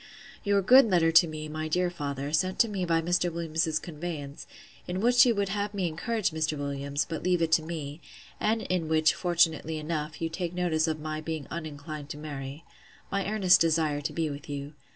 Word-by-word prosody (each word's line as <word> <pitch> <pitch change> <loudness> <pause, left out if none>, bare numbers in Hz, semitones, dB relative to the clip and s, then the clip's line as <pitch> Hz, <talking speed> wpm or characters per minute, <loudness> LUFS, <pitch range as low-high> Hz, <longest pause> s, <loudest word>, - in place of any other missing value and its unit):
Your 200 -1 +2
good 255 +7 +8
letter 170 -3 +3
to 165 +1 +7
me, 155 -1 -6
my 155 +1 -4
dear 180 +2 +1
father, 140 -3 -4
sent 185 +3 +1
to 230 - +4
me 195 -4 -2
by 165 -1 +1
Mr. 175 +1 +1
Williams's 160 -1 -1
conveyance; 150 -4 -6 0.4
in 180 +1 -2
which 245 +4 +5
you 235 - +3
would 200 -1 0
have 205 +1 -2
me 190 -3 0
encourage 205 +5 -1
Mr. 155 -1 -1
Williams, 140 0 -2
but 160 -2 -4
leave 180 -1 +2
it 165 -1 0
to 160 - +5
me; 155 -1 -6 0.4
and 220 +1 +1
in 180 -3 -1
which, 155 0 +3
fortunately 165 -3 +1
enough, 155 -1 -4
you 165 - -1
take 175 +1 -4
notice 165 -3 +1
of 155 -1 -1
my 155 0 -4
being 155 -2 -4
uninclined 150 -2 -6
to 145 - -6
marry.—My 150 +6 -7
earnest 195 -4 +5
desire 160 -3 +2
to 145 - -3
be 165 -1 -1
with 145 +2 -9
you. 140 +1 -5
160 Hz, 195 wpm, -28 LUFS, 155-180 Hz, 0.4 s, good